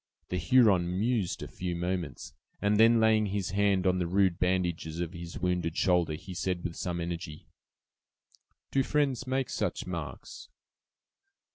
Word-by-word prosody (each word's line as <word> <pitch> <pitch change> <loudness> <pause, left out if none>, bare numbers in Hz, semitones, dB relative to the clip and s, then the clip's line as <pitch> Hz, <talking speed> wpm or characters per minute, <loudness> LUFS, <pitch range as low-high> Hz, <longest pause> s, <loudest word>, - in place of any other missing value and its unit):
The 90 - -1
Huron 90 -2 +3
mused 110 -4 0
a - - -6
few 90 -1 -4
moments, 90 -5 -4 0.3
and 105 +1 +2
then 115 +1 +6
laying 110 -1 +4
his 100 -2 -2
hand 100 -1 +2
on 90 0 +2
the 90 - 0
rude 95 -1 +2
bandages 90 -3 -1
of 85 0 -3
his 85 -1 -7
wounded 90 -2 -1
shoulder, 90 -4 +2
he 95 +4 -9
said, 90 +1 -2
with 85 -2 -4
some 90 -1 -3
energy: 85 -2 -5 1.3
"Do 135 - +3
friends 135 -3 0
make 130 0 -1
such - - -2
marks?" - - -7
90 Hz, 150 wpm, -29 LUFS, 85-105 Hz, 1.3 s, then